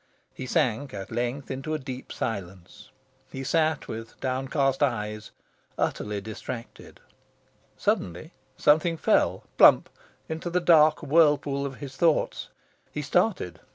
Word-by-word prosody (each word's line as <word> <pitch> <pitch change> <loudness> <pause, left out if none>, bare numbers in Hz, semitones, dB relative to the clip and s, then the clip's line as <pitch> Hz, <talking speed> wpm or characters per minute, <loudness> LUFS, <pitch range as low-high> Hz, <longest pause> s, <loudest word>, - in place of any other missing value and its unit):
He 130 - -7
sank, 130 -3 0
at 95 -1 -7
length, 125 +4 -3
into 135 +4 -3
a - - 0
deep 130 -2 -8
silence. 95 -5 -6 0.4
He 135 - -5
sat 160 +1 +1
with 115 +1 -8
downcast 135 +1 0
eyes, 105 -6 -1 0.5
utterly 105 -1 -1
distracted. 110 +3 -8 0.8
Suddenly, 90 - -1 0.3
something 160 +3 +3
fell, - - +2 0.2
plump! - - +7 0.4
into 160 +2 -4
the 180 +1 +1
dark 160 -3 +5
whirlpool 145 -2 +3
of 135 - -8
his 135 -1 -9
thoughts. 165 -1 +1 0.4
He 150 - -4
started. 175 - 0
135 Hz, 120 wpm, -26 LUFS, 115-155 Hz, 0.8 s, plump